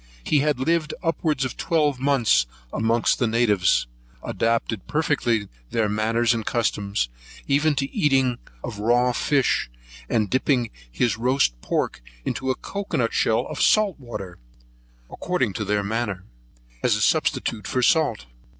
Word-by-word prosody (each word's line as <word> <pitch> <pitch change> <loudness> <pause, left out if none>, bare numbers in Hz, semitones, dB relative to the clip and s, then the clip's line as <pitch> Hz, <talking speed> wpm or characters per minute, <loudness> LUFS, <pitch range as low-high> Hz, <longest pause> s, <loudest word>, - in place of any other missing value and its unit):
He 150 - +2
had 150 -2 +1
lived 155 +3 0
upwards 155 -4 0
of 130 - -4
twelve 150 -5 +1
months 130 - +3 0.3
amongst 115 +1 +1
the 120 - +2
natives, 110 -5 +2 0.4
adopted 115 -2 -1
perfectly 125 -9 0 0.2
their 110 -2 +1
manners 115 +3 +1
and 115 -1 -2
customs, 105 - -1 0.4
even 145 +2 +2
to 135 - 0
the - - -5
eating 135 -4 +3 0.2
of 115 -4 -6
raw 120 +3 +3
fish, 135 - +1 0.4
and 110 -2 +1
dipping 125 0 +1 0.2
his 110 - 0
roast 125 - +2
pork - - -2 0.2
into 130 - -2
a 130 - +2
cocoa 200 +8 -4
nut - - 0
shell - - +2
of - - -5
salt 210 -6 +3
water, 100 -8 -8 0.7
according 130 - -1
to 110 - -3
their 105 +1 0
manner, 100 -3 -2 0.6
as - - +3
substitute 110 -3 0
for 130 - 0
salt. 145 - +2
120 Hz, 140 wpm, -24 LUFS, 110-140 Hz, 0.7 s, months